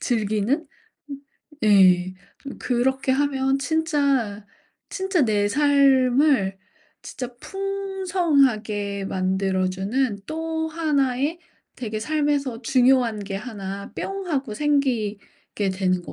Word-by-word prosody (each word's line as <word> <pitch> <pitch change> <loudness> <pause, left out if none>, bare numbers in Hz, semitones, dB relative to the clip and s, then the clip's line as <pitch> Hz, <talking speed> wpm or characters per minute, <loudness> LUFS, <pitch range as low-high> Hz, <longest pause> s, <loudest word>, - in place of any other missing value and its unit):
즐기는 220 +5 0 0.5
음 280 - -5 0.5
예 185 -3 +5 0.2
좀 275 - -9
그렇게 265 +2 0
하면 270 -1 +1
진짜, 280 -9 0 0.4
진짜 380 -4 0
내 205 -2 +1
삶을 270 -5 +3 0.5
진짜 250 -1 -7
풍성하게 330 - 0
만들어 190 0 0
주는 205 +4 -1
또 320 0 -3
하나의 300 -1 0 0.4
되게 220 -3 -4
삶에서 285 -2 -1
중요한 250 -3 +3
게 195 -1 -6
하나 200 -3 -7
뿅 390 -1 -4
하고 270 -8 -2
생기게 230 -8 -1
되는 185 -1 0
것 - - -10
255 Hz, 195 characters per minute, -23 LUFS, 205-290 Hz, 0.5 s, 예